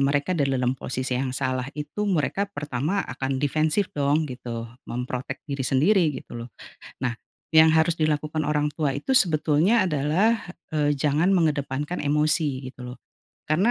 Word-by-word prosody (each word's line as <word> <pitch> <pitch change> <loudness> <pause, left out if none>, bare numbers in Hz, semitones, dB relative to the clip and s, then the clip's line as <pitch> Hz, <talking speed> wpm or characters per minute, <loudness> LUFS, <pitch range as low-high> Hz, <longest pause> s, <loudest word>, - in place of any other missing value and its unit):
mereka 140 +5 +1
dalam 135 -6 +1
posisi 130 0 -3
yang 130 -1 -2
salah 130 -1 -1
itu 150 +8 -3
mereka 190 +2 0
pertama 150 +2 -2
akan 130 +1 -3
defensif 155 +7 +1
dong 145 +2 +2
gitu 120 -2 -5 0.2
mem-protect 125 +1 -4
diri 140 -3 -4
sendiri 170 +9 +4 0.2
gitu 120 - -9
loh 115 +1 -7 0.5
nah, 125 -2 -1 0.4
yang 160 0 +8
harus 160 +1 +3
dilakukan 155 -1 0
orang 150 0 0
tua 150 -3 0
itu 150 - -2
sebetulnya 165 +4 +3
adalah, 175 +9 +2 0.3
eee, 145 -1 +2
jangan 150 +6 +2
mengedepankan 150 -2 0
emosi 150 -2 +1
gitu 130 - -14
loh, - - -12 0.5
karena, 180 +10 +3
150 Hz, 145 wpm, -25 LUFS, 135-160 Hz, 0.5 s, yang